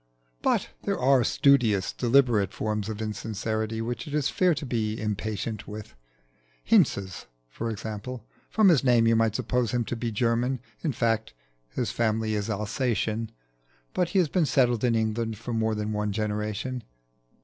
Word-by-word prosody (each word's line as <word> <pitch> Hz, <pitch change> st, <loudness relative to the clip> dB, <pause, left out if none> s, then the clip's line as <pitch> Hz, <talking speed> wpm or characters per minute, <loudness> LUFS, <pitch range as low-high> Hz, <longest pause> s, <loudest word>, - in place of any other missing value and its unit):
But -, -, +1 dB
there -, -, -1 dB
are 130 Hz, -1 st, +4 dB
studious, 115 Hz, -8 st, +3 dB
deliberate 120 Hz, -5 st, +3 dB
forms 105 Hz, -1 st, -2 dB
of 110 Hz, 0 st, -4 dB
insincerity 110 Hz, +1 st, -3 dB
which 120 Hz, +5 st, -4 dB
it 145 Hz, -, -4 dB
is 145 Hz, -2 st, +1 dB
fair 180 Hz, -3 st, +3 dB
to 150 Hz, 0 st, -5 dB
be 110 Hz, -4 st, -1 dB
impatient 105 Hz, +1 st, -3 dB
with: 105 Hz, 0 st, -8 dB, 0.7 s
Hinze's, 95 Hz, +8 st, +2 dB, 0.2 s
for 115 Hz, -, -4 dB
example. 110 Hz, +2 st, -6 dB, 0.2 s
From 215 Hz, -3 st, +5 dB
his 155 Hz, -7 st, +4 dB
name 120 Hz, -3 st, +4 dB
you 115 Hz, 0 st, +4 dB
might 115 Hz, -1 st, +2 dB
suppose 125 Hz, -1 st, 0 dB
him 120 Hz, -1 st, +1 dB
to 120 Hz, -, -3 dB
be 115 Hz, 0 st, -3 dB
German: 120 Hz, +4 st, +1 dB, 0.2 s
in 155 Hz, -, +1 dB
fact, 115 Hz, -, 0 dB, 0.3 s
his 115 Hz, -, -2 dB
family 110 Hz, -2 st, 0 dB
is 105 Hz, 0 st, -2 dB
Alsatian, 110 Hz, +1 st, -1 dB, 0.6 s
but 180 Hz, -2 st, +1 dB
has 185 Hz, -4 st, +4 dB
been 165 Hz, 0 st, +1 dB
settled 120 Hz, -4 st, +2 dB
in 120 Hz, -2 st, +3 dB
England 110 Hz, 0 st, -1 dB
for 120 Hz, +2 st, -5 dB
more 110 Hz, -1 st, +1 dB
than 105 Hz, 0 st, -2 dB
one 105 Hz, 0 st, -1 dB
generation. 105 Hz, +4 st, -2 dB
115 Hz, 160 wpm, -27 LUFS, 105-125 Hz, 0.7 s, From